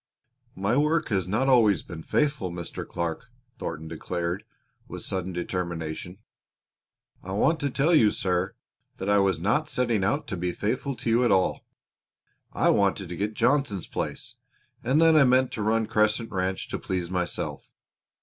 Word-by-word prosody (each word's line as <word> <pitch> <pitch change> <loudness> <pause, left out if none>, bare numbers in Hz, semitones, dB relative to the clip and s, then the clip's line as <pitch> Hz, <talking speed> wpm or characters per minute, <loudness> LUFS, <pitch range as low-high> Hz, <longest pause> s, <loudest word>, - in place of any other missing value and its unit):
"My 100 +5 0
work 155 +2 +2
has 95 -5 0
not 110 +8 +1
always 110 -8 +4
been 85 -2 -8
faithful, 145 - 0
Mr. 85 0 -6
Clark," 85 +7 -4 0.3
Thornton 80 -1 -5
declared 85 +2 -3 0.4
with - - -7
sudden 95 -1 -3
determination. 85 -1 -4 1.0
"I 95 - -6
want 160 +10 +2
to 140 - 0
tell 145 +6 +2
you, 115 -10 +6
sir, 95 -1 -1 0.4
that 95 +2 -1
I 100 - +5
was 95 -4 +2
not 120 - +1
setting 120 -7 +1
out 140 +10 0
to 95 - -3
be 90 0 -2
faithful 130 +8 -2
to 120 0 -4
you 120 +2 +4
at 120 - +3
all. 95 -1 +1 0.8
I - - +3
wanted 100 -2 +1
to 90 - -5
get 105 +4 -2
Johnson's 120 - +1
place, - - -5 0.5
and 130 +6 +2
then 165 -1 +6
I 155 - +7
meant 130 0 +3
to 110 - -4
run 110 +1 +2
Crescent 110 +1 +1
Ranch 95 0 -2
to - - -3
please 90 -2 -3
myself. 90 -1 -3
100 Hz, 165 wpm, -26 LUFS, 90-125 Hz, 1.0 s, I